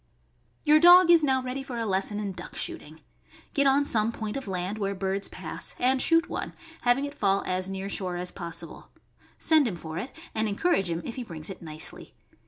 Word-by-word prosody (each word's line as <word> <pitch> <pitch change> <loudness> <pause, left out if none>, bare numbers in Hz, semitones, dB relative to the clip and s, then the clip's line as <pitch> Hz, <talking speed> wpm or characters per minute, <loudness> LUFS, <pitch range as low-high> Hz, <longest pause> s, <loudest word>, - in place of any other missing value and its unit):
Your 300 +1 +6
dog 350 +1 +8
is 335 -2 +6
now 265 -2 +2
ready 255 +2 -4
for 260 -3 -6
a 230 - -1
lesson 195 +1 0
in 205 -2 -3
duck 185 - -9
shooting. 155 +1 -5 0.5
Get 280 -2 +3
on 280 +1 +4
some 225 -3 +2
point 220 -2 -5
of 275 -5 -5
land 190 +3 -3
where 200 -1 -1
birds 195 +1 -1
pass, - - -6
and 255 +1 +2
shoot 330 +1 +3
one, - - -5 0.3
having 245 +3 +2
it 285 - -6
fall 195 -7 +1
as 185 +1 -1
near 195 0 -4
shore 185 -2 -3
as 180 0 -4
possi 170 -2 -4
ble; - - -14 0.5
send 310 -4 +4
him 200 - -3
for 160 0 -6
it, 245 +8 -6 0.2
and 220 0 0
encourage 200 - +1
him 170 0 -3
if 235 - -6
he 250 - -3
brings 165 -4 -7
it 190 - -10
nicely. 155 -1 -5
210 Hz, 210 wpm, -27 LUFS, 185-270 Hz, 0.5 s, dog